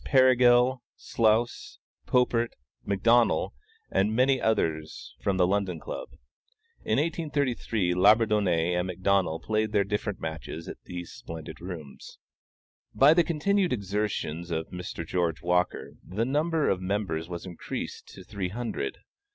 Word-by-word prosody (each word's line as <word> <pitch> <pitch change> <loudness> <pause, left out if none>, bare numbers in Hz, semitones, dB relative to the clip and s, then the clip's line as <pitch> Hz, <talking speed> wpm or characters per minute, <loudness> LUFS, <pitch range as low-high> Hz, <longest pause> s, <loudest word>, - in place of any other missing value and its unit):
Perigal, 125 -1 +5
Slous, 115 +1 0 0.3
Popert, 120 -2 +2 0.3
McDonnel, 115 +4 +3 0.4
and 105 +3 +1
many 130 +2 +3
others 80 -8 -1
from 95 -1 0
the 90 - +4
London 95 -3 0
Club. - - -6 0.7
In 110 - +1
1833, 140 - 0
Labourdonnais 100 -3 +3
and 90 +1 -2
McDonnel 95 -2 +1
played 110 0 0
their 100 -1 +4
different 105 0 -3
matches 80 0 -6
at - - -8
these 90 -1 -7
splendid 80 -1 -9
rooms. 85 -6 -9 0.8
By 140 +3 +7
the 170 +1 +4
continued 180 +4 +1
exertions 100 -6 -2
of 80 -1 -3
Mr. 90 -2 -6
George 85 -1 -1
Walker, 90 +1 0
the 105 +6 -2
number 155 +4 +1
of 95 - +1
members 95 -4 -2
was 85 0 -6
increased 90 -3 -6
to - - -11
three 95 -3 -4
hundred. 115 +4 -4
100 Hz, 125 wpm, -27 LUFS, 90-120 Hz, 0.8 s, By